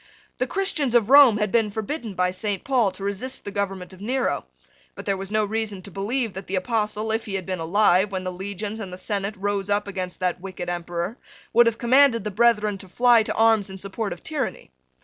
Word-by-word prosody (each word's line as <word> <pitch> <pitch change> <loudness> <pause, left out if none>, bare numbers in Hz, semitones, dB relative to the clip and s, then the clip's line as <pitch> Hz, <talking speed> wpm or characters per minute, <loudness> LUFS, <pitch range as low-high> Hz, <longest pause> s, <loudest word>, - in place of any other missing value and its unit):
The - - +1
Christians 310 - 0
of 235 0 +3
Rome 275 -6 +8
had 210 -2 -1
been 225 -3 +2
forbidden 220 +1 -4
by 180 0 +1
Saint 195 +1 -3
Paul 250 -6 +2
to 195 - -9
resist 205 +7 -3
the 205 - -5
government 195 -2 -3
of 185 - -14
Nero: 250 - -1 0.5
but - - -9
there 195 - +1
was 195 0 -6
no 215 0 +1
reason 210 -2 -3
to 200 - -9
believe 220 +4 -2
that 190 0 -8
the 195 - -2
Apostle, 215 +2 -1
if 225 +1 -1
he 200 - -3
had 190 -2 -3
been 185 -2 -3
alive 190 +3 +3
when 190 -1 -3
the 185 - -3
Legions 200 +3 -5
and 195 -4 -6
the 180 - -7
Senate 200 +1 -2
rose 200 0 -2
up 205 0 +1
against 185 -2 -5
that 180 -1 -1
wicked 180 -2 -6
Emperor, 175 +4 -4 0.3
would 235 +1 +6
have 230 -1 +1
commanded 250 -1 +4
the 210 - -3
brethren 210 -2 +2
to 190 - -13
fly 240 +3 +5
to 215 - -3
arms 225 -3 +3
in 190 - -8
support 200 +2 -4
of - - -7
tyranny. 290 - -4
205 Hz, 225 wpm, -24 LUFS, 190-225 Hz, 0.5 s, Rome